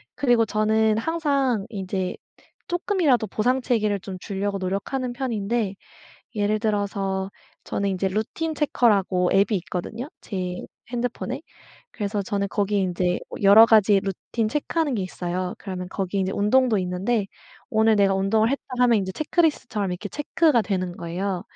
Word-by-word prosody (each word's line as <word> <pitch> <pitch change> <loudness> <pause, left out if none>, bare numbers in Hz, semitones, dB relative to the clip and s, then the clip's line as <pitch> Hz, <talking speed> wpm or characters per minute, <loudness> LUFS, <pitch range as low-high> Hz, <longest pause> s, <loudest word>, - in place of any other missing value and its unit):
그리고 240 -4 +3
저는 215 0 +2
항상 275 -7 0
이제 190 -3 -3 0.5
쪼끔이라도 345 - +1
보상 245 +6 +1
체계를 215 -5 +1
좀 190 -1 -7
주려고 200 +1 -3
노력하는 200 +7 -2
편인데 230 -4 -1 0.6
예를 210 0 +1
들어서 200 -3 -1 0.3
저는 200 0 -1
이제 190 0 -1
루틴 220 - -2
체커라고 200 - +2
앱이 200 +2 +3
있거든요 180 +9 -5
제 180 -3 -4 0.3
핸드폰에? 245 +2 -3 0.5
그래서 205 -1 -2
저는 200 0 -1
거기에 205 0 0
인제 180 -1 0 0.2
여러 205 +3 +9
가지 210 -3 +5
루틴 200 +3 -3
체크하는 295 +3 -1
게 205 - -1
있어요. 180 0 -3
그러면 185 -3 -6
거기에 195 0 -2
이제 190 +1 -1
운동도 225 +2 +3
있는데 195 +4 -1 0.4
"오늘 220 -2 +4
내가 195 -1 +4
운동을 215 +4 +2
했다." 275 - -2 0.2
하면 240 -3 +5
이제 190 -1 -3
체크리스트처럼 290 - 0
이렇게 180 +3 -5
체크가 295 -3 +2
되는 185 -3 -2
거예요. 180 +2 -3
205 Hz, 350 characters per minute, -24 LUFS, 190-240 Hz, 0.6 s, 여러